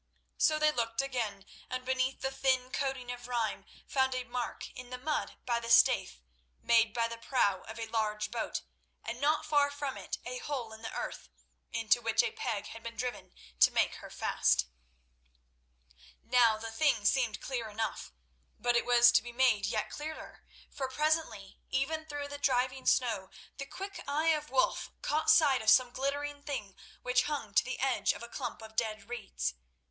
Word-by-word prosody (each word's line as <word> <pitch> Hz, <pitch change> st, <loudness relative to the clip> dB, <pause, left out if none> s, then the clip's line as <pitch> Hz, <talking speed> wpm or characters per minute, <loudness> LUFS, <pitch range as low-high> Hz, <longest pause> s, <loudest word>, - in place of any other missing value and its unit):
So 310 Hz, -1 st, +4 dB
they 305 Hz, 0 st, +4 dB
looked 235 Hz, -1 st, -1 dB
again, 220 Hz, -7 st, -3 dB, 0.2 s
and 255 Hz, 0 st, -4 dB
beneath 260 Hz, +1 st, 0 dB
the 265 Hz, -, -1 dB
thin 260 Hz, -1 st, +1 dB
coating 265 Hz, -3 st, -2 dB
of 245 Hz, 0 st, -8 dB
rime, 235 Hz, -3 st, -1 dB, 0.2 s
found 265 Hz, -1 st, +1 dB
a 255 Hz, -, -2 dB
mark 245 Hz, 0 st, -4 dB
in 250 Hz, -1 st, -10 dB
the 250 Hz, -, -5 dB
mud 295 Hz, +4 st, -2 dB
by 235 Hz, -1 st, +1 dB
the 230 Hz, 0 st, -6 dB
Staithe, 235 Hz, -, +5 dB, 0.5 s
made 230 Hz, -2 st, +4 dB
by 230 Hz, +1 st, 0 dB
the 230 Hz, 0 st, -7 dB
prow 205 Hz, -6 st, +1 dB
of 220 Hz, +1 st, -8 dB
a 230 Hz, -, -3 dB
large 215 Hz, -2 st, -1 dB
boat, 230 Hz, -1 st, -3 dB, 0.4 s
and 235 Hz, +3 st, -5 dB
not 300 Hz, +2 st, +2 dB
far 290 Hz, -2 st, +3 dB
from 285 Hz, -1 st, -4 dB
it -, -, -5 dB
a -, -, -4 dB
hole 260 Hz, -, -4 dB
in 220 Hz, -, -11 dB
the 225 Hz, -, -5 dB
earth -, -, -5 dB, 0.4 s
into 230 Hz, 0 st, +2 dB
which -, -, +3 dB
a -, -, -1 dB
peg 225 Hz, -, -3 dB
had 225 Hz, -, -9 dB
been 230 Hz, 0 st, -7 dB
driven 250 Hz, -1 st, -4 dB, 0.2 s
to -, -, +8 dB
make -, -, +1 dB
her -, -, -10 dB
fast. 70 Hz, -, +2 dB, 1.6 s
Now 235 Hz, -3 st, +4 dB
the 225 Hz, +1 st, -6 dB
thing 225 Hz, -3 st, +2 dB
seemed 235 Hz, -1 st, +2 dB
clear 240 Hz, -5 st, -4 dB
enough, 220 Hz, +1 st, -3 dB, 0.5 s
but 245 Hz, 0 st, +1 dB
it 235 Hz, -, +2 dB
was 240 Hz, 0 st, +7 dB
to -, -, +5 dB
be 240 Hz, -, -8 dB
made 235 Hz, -5 st, +3 dB
yet 215 Hz, -, -2 dB
clearer, 310 Hz, +1 st, -7 dB, 0.3 s
for 265 Hz, -2 st, -3 dB
presently, 300 Hz, -9 st, -1 dB
even 315 Hz, +4 st, -1 dB
through 290 Hz, -1 st, -4 dB
the 285 Hz, 0 st, -7 dB
driving 260 Hz, -1 st, +1 dB
snow, 220 Hz, -7 st, +2 dB, 0.3 s
the 275 Hz, -, -4 dB
quick 390 Hz, +5 st, -7 dB
eye 305 Hz, +3 st, +1 dB
of 300 Hz, -1 st, +1 dB
Wulf -, -, +1 dB
caught 310 Hz, +1 st, +1 dB
sight 300 Hz, -5 st, +6 dB
of 220 Hz, -, +2 dB
some 250 Hz, +1 st, +6 dB
glittering 285 Hz, +2 st, -2 dB
thing 210 Hz, -10 st, -5 dB, 0.3 s
which 250 Hz, 0 st, +2 dB
hung 285 Hz, -9 st, -3 dB
to -, -, +5 dB
the 255 Hz, +2 st, -5 dB
edge 265 Hz, -1 st, +2 dB
of -, -, -9 dB
a -, -, -6 dB
clump 225 Hz, -, -5 dB
of 220 Hz, 0 st, -11 dB
dead 215 Hz, -2 st, -2 dB
reeds. 65 Hz, -, -3 dB
250 Hz, 185 wpm, -32 LUFS, 225-280 Hz, 1.6 s, to